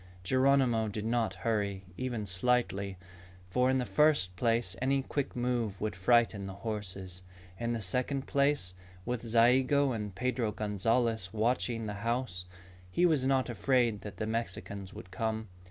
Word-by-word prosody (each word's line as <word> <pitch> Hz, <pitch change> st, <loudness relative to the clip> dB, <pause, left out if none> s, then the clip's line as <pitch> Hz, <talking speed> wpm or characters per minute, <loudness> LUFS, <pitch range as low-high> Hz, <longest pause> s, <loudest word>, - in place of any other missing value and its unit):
Geronimo 130 Hz, 0 st, +3 dB
did 105 Hz, +1 st, -4 dB
not 115 Hz, -4 st, 0 dB
hurry 100 Hz, -4 st, 0 dB
even 120 Hz, -2 st, -3 dB
slightly, 100 Hz, -1 st, 0 dB, 0.5 s
for 125 Hz, +6 st, +3 dB
in 130 Hz, -, +3 dB
the 125 Hz, -, 0 dB
first 150 Hz, -13 st, +3 dB
place 115 Hz, -2 st, +1 dB
any 135 Hz, +1 st, +2 dB
quick 140 Hz, 0 st, -3 dB
move 120 Hz, -5 st, -1 dB
would 105 Hz, -2 st, -2 dB
frighten 105 Hz, 0 st, +3 dB
the 95 Hz, -, -7 dB
horses. 95 Hz, -4 st, -5 dB, 0.4 s
In 120 Hz, 0 st, -1 dB
the 115 Hz, -, -2 dB
second 130 Hz, +7 st, 0 dB
place, 140 Hz, -10 st, +1 dB, 0.3 s
with 120 Hz, -1 st, -2 dB
Zayigo 130 Hz, +4 st, +4 dB
and 105 Hz, -5 st, -4 dB
Pedro 125 Hz, -2 st, -1 dB
Gonzalez 110 Hz, -1 st, 0 dB
watching 115 Hz, +1 st, 0 dB
the 105 Hz, -, -3 dB
house, 115 Hz, -6 st, -2 dB, 0.4 s
he 175 Hz, -, +2 dB
was 150 Hz, -6 st, +3 dB
not 135 Hz, -1 st, +2 dB
afraid 120 Hz, -3 st, +1 dB
that 100 Hz, -3 st, -8 dB
the 110 Hz, -, -2 dB
Mexicans 100 Hz, -3 st, -4 dB
would 95 Hz, -, -11 dB
come. 110 Hz, +2 st, -2 dB
115 Hz, 150 wpm, -31 LUFS, 100-125 Hz, 0.5 s, Zayigo